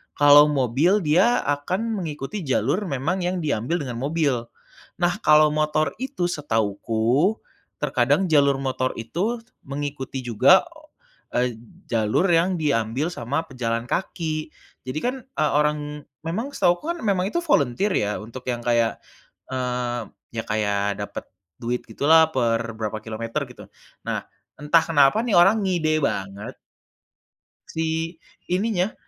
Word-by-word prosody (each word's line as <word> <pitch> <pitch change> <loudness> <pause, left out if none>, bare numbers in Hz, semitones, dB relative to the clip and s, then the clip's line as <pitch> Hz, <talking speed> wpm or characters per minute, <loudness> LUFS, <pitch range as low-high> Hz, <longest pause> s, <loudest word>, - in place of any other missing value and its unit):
kalau 145 0 +8
mobil, 145 - +2
dia 185 +10 +3
akan 145 +7 -1 0.2
mengikuti 160 +3 -5
jalur 140 - 0
memang 160 +3 -1
yang 180 0 -1
diambil 155 +3 -1
dengan 125 -4 -5
mobil. 145 +2 +1 0.7
Nah, 175 +2 +2
kalau 150 0 +6
motor 155 -1 +1
itu 260 -9 -2
setahuku, 115 - 0 0.5
terkadang 145 +5 +2
jalur 140 -2 +4
motor 130 -1 -1
itu 180 - -2 0.3
mengikuti 140 -1 -4
juga, 125 - +5 0.7
eee, 120 -2 0 0.3
jalur 110 - +2
yang 175 +3 +3
diambil 135 -1 0
sama 140 +2 -2
pejalan 115 -3 -2
kaki. 160 -4 -2 0.4
Jadi 130 +4 -2
kan, 250 +2 0
eee, 155 - -1
orang 150 0 -1 0.2
memang 215 +12 -3
setahuku 180 - +1
kan - - -9
memang 195 -3 +1
itu 345 - 0
volunter 195 - +2
ya, 105 0 0
untuk 115 +3 -9
yang 120 -1 -2
kayak, 120 -1 +1 0.5
eee, 125 -2 -2 0.4
ya 115 - -1
kayak 100 -1 0
dapet - - -7 0.4
duit 120 +1 -2
gitulah 160 +2 +4
per 115 -3 0
berapa 110 -1 -3
kilometer 115 +1 -3
gitu. - - -12 0.4
Nah, - - -2 0.4
entah 150 +3 +4
kenapa 145 +4 +4
nih 220 -7 +1
orang 195 +5 +5
ngide 160 -4 +1
banget 100 -3 -3 1.1
si 160 +1 -2 0.3
ininya, 190 +1 0
145 Hz, 130 wpm, -23 LUFS, 120-175 Hz, 1.1 s, kalau